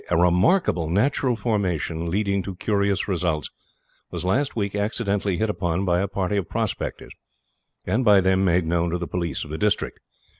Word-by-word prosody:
A 90 - +2
remarkable 90 - +3
natural 125 - +1
formation, 90 -7 -1
leading 100 +1 0
to 95 0 -6
curious 100 0 0
results, 85 -5 -1 0.6
was - - -5
last 130 +10 +1
week 100 -3 -1
accidentally 100 -2 -1
hit 110 - +1
upon 90 -2 -1
by 90 -1 +2
a 100 - 0
party 100 +1 -1
of 95 -5 -2
prospectors, - - -3 0.7
and 125 +4 +1
by 105 -4 +6
them 95 0 +2
made 90 -2 +2
known 85 +1 +1
to 85 - -1
the 85 - -4
police 85 -2 -2
of 75 - -9
the 80 - -4
district. 105 -1 0
95 Hz, 175 wpm, -24 LUFS, 85-105 Hz, 0.7 s, by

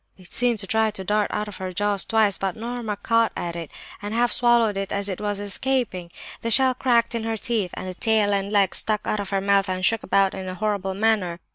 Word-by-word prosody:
It 185 -2 -11
seemed 240 -1 +2
to - - -4
try 220 +3 +2
to 205 -3 -5
dart 210 +2 +1
out 210 0 -2
of 205 - -9
her 185 -1 -5
jaws 205 +1 0
twice, 215 -3 +2
but 195 -2 -2
Norma 230 -2 -4
caught 230 +2 +2
at 170 -1 -4
it 165 -3 -6 0.3
and 205 +2 -4
half 240 +1 +2
swallowed 235 -3 +3
it 195 0 -3
as 200 0 -1
it 190 -1 -4
was 205 -1 -2
escaping. 205 -3 -2 0.3
The 230 - -2
shell 260 +3 +6
cracked 240 -2 +2
in 230 -1 -2
her 225 0 -2
teeth; 215 -4 -1
and - - -6
the 185 - -4
tail 215 0 +2
and 200 0 -1
legs 200 -3 +2
stuck 215 -1 0
out 215 - -1
of 200 -1 -4
her 195 -1 0
mouth 200 0 +2
and 185 0 -1
shook 225 +2 +2
about 195 -1 +2
in 190 - -6
a 185 - -5
horrible 200 -2 -2
manner. 200 -5 +1
205 Hz, 245 wpm, -24 LUFS, 195-225 Hz, 0.3 s, shell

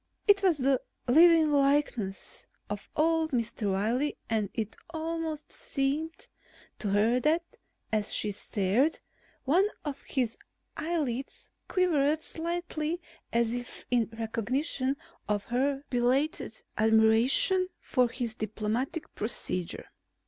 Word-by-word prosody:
It 400 -1 +6
was 365 -5 +3
the 270 -1 +2 0.3
living 320 +3 +6
likeness 275 -8 +1 0.2
of 205 -1 -5
old 320 0 +2
Mr. 230 -5 -1
Wiley 235 +9 0
and 215 -3 +1
it 220 -2 -3
almost 320 -1 -4
seemed 295 +4 -2 0.5
to 210 - -2
her 215 +5 +3
that, 315 +6 +2 0.5
as 215 -1 +1
she 210 - +2
stared, 205 +9 +1 0.5
one 350 +9 +4 0.2
of 285 -2 -4
his 245 -5 -2 0.4
eyelids 295 -6 -3 0.2
quivered 315 -5 +2
slightly 335 -1 -3 0.3
as 235 0 +2
if 245 0 -6
in 235 -3 +2
recognition 255 +5 -1 0.3
of 205 -1 +1
her 270 +4 0
belated 265 +7 0 0.2
admiration 225 - +4
for 250 -2 +1
his 240 -3 -4
diplomatic 220 - -3
procedure. 185 -5 -2
265 Hz, 110 wpm, -29 LUFS, 225-315 Hz, 0.5 s, It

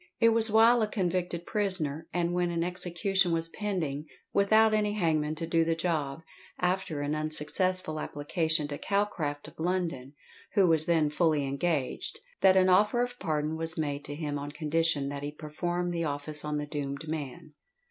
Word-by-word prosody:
It 230 - +6
was 225 0 +5
while 225 +2 +5
a 215 - +2
convicted 180 -4 -2
prisoner 165 -7 +1
and 175 0 0
when 175 0 +1
an 170 -1 -1
execution 180 +1 +1
was 165 0 0
pending 165 -8 -3 0.3
without 215 +2 +4
any 210 -1 +1
hangman 155 -6 0
to 165 +1 -4
do 165 0 +2
the 165 0 0
"job," 160 -3 -2 0.3
after 180 -4 -1
an 145 +1 -1
unsuccessful 155 +2 -1
application 155 +1 -1
to 145 - -5
Calcraft 165 -8 -1
of 155 - -23
London, 165 -6 -2 0.4
who 200 -3 +5
was 160 -1 +3
then 160 -3 +2
fully 155 -2 +2
engaged, 140 0 -2 0.2
that 190 0 +5
an 185 0 +5
offer 210 +6 +4
of 245 0 -6
pardon 155 -2 -1
was 165 +1 -2
made 145 -2 -2
to 145 - -5
him 145 -2 -3
on 145 +1 -6
condition 155 -2 0
that 140 0 -5
he 145 0 -4
performed 175 +4 -3
the 170 -1 -1
office 150 +1 -1
on 150 0 -2
the 150 - -2
doomed 145 0 -5
man. 155 0 -6
165 Hz, 175 wpm, -29 LUFS, 150-185 Hz, 0.4 s, It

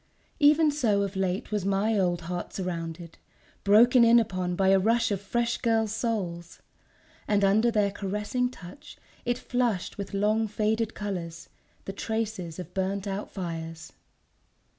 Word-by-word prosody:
Even 300 +1 +5
so 225 -9 +1
of 200 0 -4
late 190 +4 -2
was 210 -3 -1
my 200 +3 +1
old 175 -3 +1
heart 175 +1 -5
surrounded, 170 -2 -5 0.4
broken 235 +5 +6
in 235 +1 +7
upon 185 -5 -2
by 190 +1 +2
a 195 0 +5
rush 230 +3 +2
of 200 -2 -1
fresh 235 +3 -1
girls' 225 -3 +1
souls... 180 -8 -3 0.7
and 205 -1 +2
under 215 +4 +4
their 210 -3 +1
caressing 210 +5 -2
touch 255 +7 -12 0.3
it 245 0 0
flushed 240 -8 -1
with 200 0 -5
long 215 +2 +2
faded 220 +1 -1
colours, 170 -5 -5 0.4
the 195 - -5
traces 215 -6 -3
of 180 -1 -8
burnt 195 +1 -2
out 200 +1 -4
fires 165 -3 -6
200 Hz, 145 wpm, -27 LUFS, 185-225 Hz, 0.7 s, in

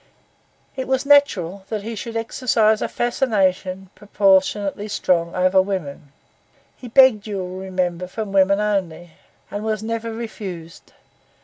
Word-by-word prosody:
It 260 -1 -4
was 265 +1 0
natural 200 - +3
that 215 -2 -3
he 230 +2 -5
should 230 +1 -5
exercise 225 -2 +1
a - - 0
fascination 195 -6 -1
proportionally 200 0 +1
strong 175 -5 0
upon 185 +1 +3
women. 150 -7 -5 0.6
He 250 - -11
begged, 235 -4 +5
you 205 -2 -4
will 185 0 -5
remember, 185 -2 -3
from 215 +1 -5
women 195 +1 +3
only, 185 -5 -2 0.4
and 205 +1 -4
was 215 -1 -2
never 230 0 -3
refused. 195 -7 -8
200 Hz, 130 wpm, -21 LUFS, 185-225 Hz, 0.6 s, begged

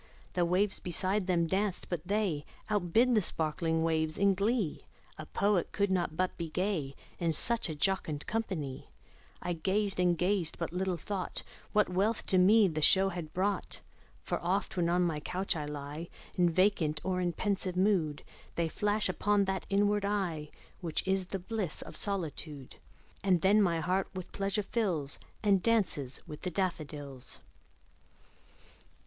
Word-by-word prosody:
The 175 -1 +2
waves 190 +3 +1
beside 185 +3 -1
them 175 -2 +3
danced; 190 +2 -1
but 175 -4 -2
they 195 -7 0 0.3
Outdid 210 +5 +3
the 215 - +4
sparkling 160 -1 -1
waves 160 -1 +1
in 200 0 +4
glee; 200 -2 0 0.3
A 155 - -7
poet 200 -4 +1
could 200 -2 +1
not 175 -4 0
but 185 0 0
be 165 -1 -3
gay, 170 -6 -1 0.2
In 170 -1 +1
such 230 +5 +1
a 155 - -3
jocund 155 -3 0
company; 175 -12 -3 0.5
I 175 - -1
gazed 195 +4 0
and 175 -1 +3
gazed 180 -2 0
but 170 0 -3
little 185 0 0
thought 190 +3 -4 0.3
What 210 0 +4
wealth 200 +5 0
to 185 - +6
me 205 +3 +6
the 155 -3 -2
show 190 +5 +6
had 170 -5 -5
brought: 195 +2 -1 0.4
For - - -2
oft, 190 +4 0
when 170 -2 +1
on 180 +1 +3
my 165 -4 0
couch 185 +5 -1
I 150 -2 -3
lie 150 +3 -6 0.3
In 175 -2 +4
vacant 170 -4 +2
or 185 -1 0
in 175 -1 +1
pensive 190 -2 -1
mood, 180 -7 +2 0.3
They 170 -1 0
flash 210 +4 +1
upon 200 +2 +2
that 190 -2 -2
inward 205 +1 +2
eye 180 -7 -1 0.3
Which 170 0 -2
is 190 -1 +1
the 195 - -3
bliss 190 -2 -3
of - - -10
solitude; 160 - -4 0.5
And 185 -4 +3
then 205 +3 +5
my 170 -4 +2
heart 185 +4 +1
with 185 -2 -6
pleasure 200 +1 -1
fills, 180 - -1 0.2
And 200 -3 +4
dances 185 - +1
with 155 -3 -9
the 185 - -2
daffodils. 150 -8 -4
185 Hz, 160 wpm, -31 LUFS, 165-200 Hz, 0.5 s, to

